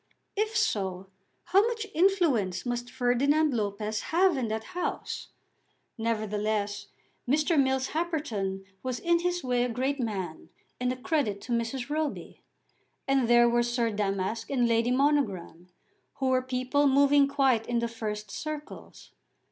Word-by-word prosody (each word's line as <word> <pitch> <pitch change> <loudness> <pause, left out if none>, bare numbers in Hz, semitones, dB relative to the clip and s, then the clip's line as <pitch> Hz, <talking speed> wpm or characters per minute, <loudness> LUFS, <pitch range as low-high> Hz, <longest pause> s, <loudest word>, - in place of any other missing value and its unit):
If 430 +1 0
so, 190 - -1 0.3
how 370 +3 +4
much 455 -2 -3
influence 320 - +2
must 240 0 -3
Ferdinand 270 +5 +2
Lopez 210 0 -2
have 360 +1 +4
in 255 -4 -1
that 220 0 -3
house! 360 - -3 0.7
Nevertheless, 215 -2 -2 0.4
Mr. 305 +4 +2
Mills 265 -2 +2
Happerton 265 - -2 0.2
was 255 -1 -3
in 340 +3 +2
his 355 0 -1
way 245 -1 +1
a 250 - -1
great 260 +4 -1
man, 190 -9 -4 0.3
and 250 0 0
a - - -2
credit 250 -6 -1
to 245 - -8
Mrs. 240 +3 -2
Roby. 305 -1 -3 0.7
And 270 -3 +2
there 240 0 +6
were 240 0 +3
Sir 240 -1 0
Damask 200 +1 -2
and 250 -3 +2
Lady 230 +1 +2
Monogram, 250 - 0 0.5
who 265 -1 0
were 255 0 +3
people 255 +3 +1
moving 280 +1 +5
quite 270 -5 +2
in 240 - 0
the 235 0 0
first 215 -3 -5
circles. 305 -1 -7
250 Hz, 140 wpm, -28 LUFS, 220-290 Hz, 0.7 s, there